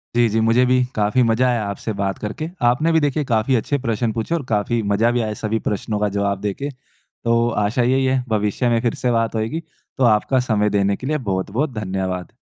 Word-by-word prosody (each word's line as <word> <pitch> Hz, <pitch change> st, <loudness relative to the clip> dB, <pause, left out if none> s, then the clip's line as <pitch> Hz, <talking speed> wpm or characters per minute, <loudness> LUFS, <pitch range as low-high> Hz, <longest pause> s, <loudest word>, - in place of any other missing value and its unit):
जी, 120 Hz, 0 st, +4 dB
जी। 110 Hz, +2 st, 0 dB
मुझे 115 Hz, +3 st, +4 dB
भी 125 Hz, 0 st, +3 dB
काफ़ी 105 Hz, +4 st, +2 dB
मज़ा 115 Hz, +2 st, +2 dB
आया 120 Hz, -3 st, 0 dB
आपसे 100 Hz, +2 st, -4 dB
बात 95 Hz, -1 st, -1 dB
करके। 115 Hz, +10 st, -4 dB, 0.2 s
आपने 155 Hz, +7 st, +1 dB
भी 160 Hz, -, +4 dB
देखिए 145 Hz, 0 st, 0 dB
काफ़ी 115 Hz, +1 st, +1 dB
अच्छे 125 Hz, +5 st, 0 dB
प्रश्न 115 Hz, 0 st, 0 dB
पूछे 115 Hz, +8 st, -2 dB
और 165 Hz, -, -2 dB
काफ़ी 115 Hz, 0 st, 0 dB
मज़ा 105 Hz, +3 st, +2 dB
भी 120 Hz, 0 st, +1 dB
आया 110 Hz, -1 st, -2 dB
सभी 110 Hz, +1 st, -1 dB
प्रश्नों 105 Hz, +1 st, -2 dB
का 105 Hz, 0 st, +1 dB
जवाब 100 Hz, -1 st, 0 dB
देके। 105 Hz, +8 st, -3 dB
तो 120 Hz, -3 st, -3 dB, 0.2 s
आशा 110 Hz, +4 st, +1 dB
यही 130 Hz, +2 st, +2 dB
है 130 Hz, -1 st, +1 dB
भविष्य 105 Hz, +3 st, 0 dB
में 115 Hz, -1 st, +2 dB
फ़िर 120 Hz, -1 st, 0 dB
से 125 Hz, -, +2 dB
बात 115 Hz, -1 st, 0 dB
होएगी। 115 Hz, +9 st, -2 dB, 0.4 s
तो 135 Hz, -, +1 dB
आपका 120 Hz, +3 st, +3 dB
समय 105 Hz, -1 st, +2 dB
देने 100 Hz, -1 st, +1 dB
के 130 Hz, -, -7 dB
लिए 155 Hz, +1 st, +1 dB
बहुत-बहुत 110 Hz, +10 st, -1 dB
धन्यवाद। 95 Hz, -3 st, -3 dB
115 Hz, 215 wpm, -20 LUFS, 105-125 Hz, 0.4 s, जी